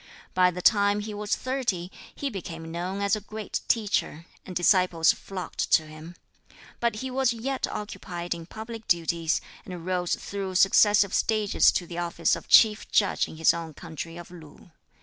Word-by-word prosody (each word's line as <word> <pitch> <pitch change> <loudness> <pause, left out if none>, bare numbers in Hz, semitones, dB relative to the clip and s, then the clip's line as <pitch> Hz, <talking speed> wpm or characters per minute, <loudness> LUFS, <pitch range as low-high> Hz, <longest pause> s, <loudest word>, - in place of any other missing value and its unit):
By 180 0 +4
the 180 0 -6
time 205 0 +4
he 210 0 -6
was 205 0 -1
thirty 240 -9 -2 0.2
he 280 -1 -3
became 165 -5 -7
known 180 +4 -4
as 200 +1 +2
a 215 - -6
great 215 0 -5
teacher, 205 -7 0 0.2
and 185 - -8
disciples 175 -2 +4
flocked 190 -2 -5
to 160 - +5
him. 155 +3 -11 0.6
But 235 -2 0
he 260 - -4
was 260 -1 +1
yet 260 +3 -2
occupied 180 -4 -5
in 165 -1 -9
public 220 +2 -8
duties, 170 -1 +1 0.2
and 180 -3 -8
rose 180 -1 0
through 195 -2 -5
successive 200 +1 +5
stages 215 -2 +3
to 175 - -1
the 170 0 -6
office 170 -1 +1
of - - -10
Chief 215 -1 +5
Judge 200 - +2
in - - -11
his 160 - +4
own 165 -3 -6
country 165 0 -8
of 175 0 -10
Lu. 165 0 -14
185 Hz, 170 wpm, -26 LUFS, 170-210 Hz, 0.6 s, to